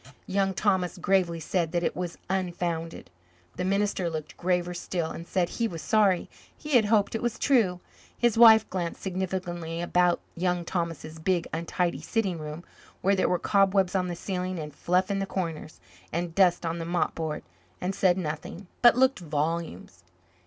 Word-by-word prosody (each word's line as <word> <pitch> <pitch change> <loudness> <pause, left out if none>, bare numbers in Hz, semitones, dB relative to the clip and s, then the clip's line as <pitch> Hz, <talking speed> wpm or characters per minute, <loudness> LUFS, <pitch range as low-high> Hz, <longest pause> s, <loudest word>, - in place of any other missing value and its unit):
Young 195 0 0
Thomas 190 -3 +1
gravely 180 -3 +1
said 165 0 -1
that 175 0 +1
it - - 0
was 175 -1 -4
unfounded. 175 - -3 0.4
The 180 - -3
minister 195 -2 0
looked 155 -2 -6
graver 180 0 0
still 170 -1 -3
and 170 - -8
said 180 -2 +1
he 230 +5 -1
was 165 -6 -7
sorry 205 -5 +3 0.3
he 300 - -8
had 240 -6 +5
hoped 205 -1 +2
it 225 - -2
was 240 -2 -1
true. 205 -10 +2 0.4
His 240 -2 +2
wife 220 -2 +8
glanced 175 -3 -3
significantly 180 -3 -3
about 175 0 +2 0.2
Young 180 0 0
Thomas's 165 -2 -4
big, 175 +1 0
untidy 170 +2 -1
sitting 195 -7 -1
room, 155 +2 -7 0.4
where 195 +1 +3
there 190 - +1
were 180 - +2
cobwebs 195 -1 +2
on 185 -2 +1
the 175 - -3
ceiling 185 0 -3
and 150 -2 -6
fluff 180 +6 +1
in 195 - 0
the 195 - -2
corners 165 -5 -4 0.3
and 170 0 -2
dust 175 -2 +3
on 165 +1 -2
the 165 - -4
mop 175 0 0
board, 160 -2 -4 0.4
and 185 +2 -2
said 185 -2 +3
nothing, 165 +2 -5 0.2
but 240 -1 +7
looked 260 -1 +3
volumes. 155 - -3
180 Hz, 175 wpm, -27 LUFS, 170-195 Hz, 0.4 s, wife